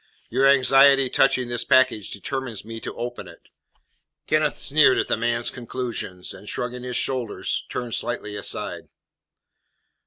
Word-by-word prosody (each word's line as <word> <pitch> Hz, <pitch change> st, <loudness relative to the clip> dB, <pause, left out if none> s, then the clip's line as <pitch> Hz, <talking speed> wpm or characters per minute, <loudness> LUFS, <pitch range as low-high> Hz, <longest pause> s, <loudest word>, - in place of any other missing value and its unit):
Your 130 Hz, +3 st, +3 dB
anxiety 135 Hz, 0 st, +5 dB
touching 130 Hz, -2 st, +2 dB
this 120 Hz, -1 st, -2 dB
package 130 Hz, -6 st, +3 dB
determines 120 Hz, 0 st, -5 dB
me 115 Hz, 0 st, -7 dB
to -, -, -7 dB
open 120 Hz, +1 st, -5 dB
it." -, -, -16 dB, 0.8 s
Kenneth 155 Hz, -1 st, +1 dB
sneered 140 Hz, -3 st, +4 dB
at -, -, 0 dB
the -, -, +1 dB
man's 115 Hz, +1 st, -1 dB
conclusions, 120 Hz, -7 st, -5 dB
and, 100 Hz, +2 st, -11 dB
shrugging 125 Hz, 0 st, -4 dB
his 125 Hz, 0 st, -3 dB
shoulders, 125 Hz, -5 st, -2 dB
turned 120 Hz, -2 st, -4 dB
slightly 120 Hz, -3 st, -2 dB
aside. -, -, -4 dB
125 Hz, 135 wpm, -23 LUFS, 115-135 Hz, 0.8 s, anxiety